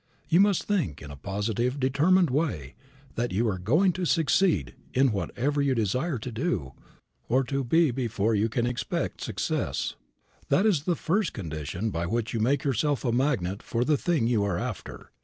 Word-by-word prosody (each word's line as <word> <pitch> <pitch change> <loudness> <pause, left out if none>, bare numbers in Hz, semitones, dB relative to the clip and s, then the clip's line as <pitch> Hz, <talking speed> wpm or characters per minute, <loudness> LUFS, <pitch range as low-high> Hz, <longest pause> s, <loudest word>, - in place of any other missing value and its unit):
You 170 +2 +4
must 200 -2 +4
think 170 - -1
in 75 - -9
a - - -8
positive 105 - -2
determined 150 +6 +3
way 130 - -1 0.4
that 120 0 -2
you 110 +6 +1
are 95 -4 -1
going 155 - +3
to 185 0 -2
succeed 160 - +2 0.2
in 130 0 +4
whatever 135 +8 -1
you 140 -2 +2
desire 125 - 0
to 120 +3 -6
do 110 - -2 0.6
or 130 +3 +3
to 135 +1 -2
be 160 +4 +3
before 115 -3 0
you 110 +2 +2
can 120 +2 0
expect 120 0 -2
success. - - -2 0.6
That 190 - +3
is 170 -9 +2
the 175 - +1
first 180 +3 0
condition 85 +4 -4
by 85 -1 -2
which 115 +4 -2
you 115 - -1
make 130 +5 +1
yourself 140 +1 0
a 120 - +2
magnet 115 -7 0
for 120 +1 -1
the 150 +2 +3
thing 160 -4 0
you 115 -3 +2
are 100 -4 0
after. - - -6
125 Hz, 180 wpm, -27 LUFS, 105-150 Hz, 0.6 s, You